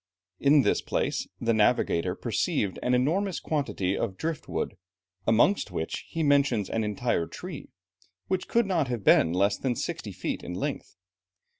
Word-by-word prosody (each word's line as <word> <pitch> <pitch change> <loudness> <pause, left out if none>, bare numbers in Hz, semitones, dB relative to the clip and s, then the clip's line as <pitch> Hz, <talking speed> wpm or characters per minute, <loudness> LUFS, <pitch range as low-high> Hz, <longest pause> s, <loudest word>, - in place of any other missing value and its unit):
In 140 0 +5
this - - +2
place, - - -1
the 115 0 +1
navigator 105 -6 +2
perceived 100 -3 -1
an 125 0 +2
enormous 170 +9 +1
quantity 115 - -1
of 95 -5 -2
drift 160 -1 -4
wood, - - -2 0.5
amongst 115 - +3
which 85 -3 -4
he 165 - -2
mentions 140 -8 +2
an 115 - 0
entire 105 -4 -1
tree, - - -8 0.6
which 185 -1 -1
could 235 -1 +2
not 170 -8 +1
have 120 -4 -3
been 80 - +5
less 100 +3 +2
than 130 -3 0
sixty - - -4
feet - - -4
in 90 - -5
length. 90 - -4
120 Hz, 155 wpm, -27 LUFS, 100-150 Hz, 0.6 s, In